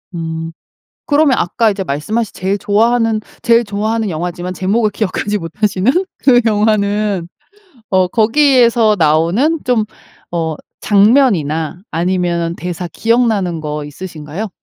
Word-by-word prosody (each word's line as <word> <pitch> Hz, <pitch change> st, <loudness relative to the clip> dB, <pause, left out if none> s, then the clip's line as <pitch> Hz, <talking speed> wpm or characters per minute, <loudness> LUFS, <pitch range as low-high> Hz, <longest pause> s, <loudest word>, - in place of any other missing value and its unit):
음. 165 Hz, 0 st, -4 dB, 0.6 s
그러면 290 Hz, -3 st, +3 dB
아까 220 Hz, +5 st, +1 dB
이제 200 Hz, -1 st, -3 dB
말씀하신 190 Hz, +9 st, -2 dB
제일 190 Hz, +2 st, -1 dB
좋아하는 225 Hz, +2 st, +1 dB, 0.2 s
제일 235 Hz, 0 st, +4 dB
좋아하는 215 Hz, +1 st, -2 dB
영화지만 175 Hz, +2 st, -4 dB
제목을 210 Hz, +4 st, +1 dB
기억하지 210 Hz, 0 st, -2 dB
못하시는 195 Hz, +5 st, 0 dB, 0.3 s
그 245 Hz, -3 st, +4 dB
영화는 210 Hz, -3 st, +1 dB, 0.6 s
어 185 Hz, -1 st, +3 dB
거기에서 235 Hz, -1 st, +3 dB
나오는 170 Hz, -, +2 dB
좀 240 Hz, -4 st, +1 dB, 0.5 s
어 160 Hz, -2 st, -2 dB, 0.2 s
장면이나 195 Hz, -, +2 dB
아니면은 170 Hz, 0 st, -1 dB
대사 175 Hz, 0 st, -5 dB
기억나는 215 Hz, -3 st, 0 dB
거 150 Hz, -1 st, -4 dB
있으신가요? 155 Hz, +5 st, -7 dB
200 Hz, 300 characters per minute, -15 LUFS, 170-225 Hz, 0.6 s, 제일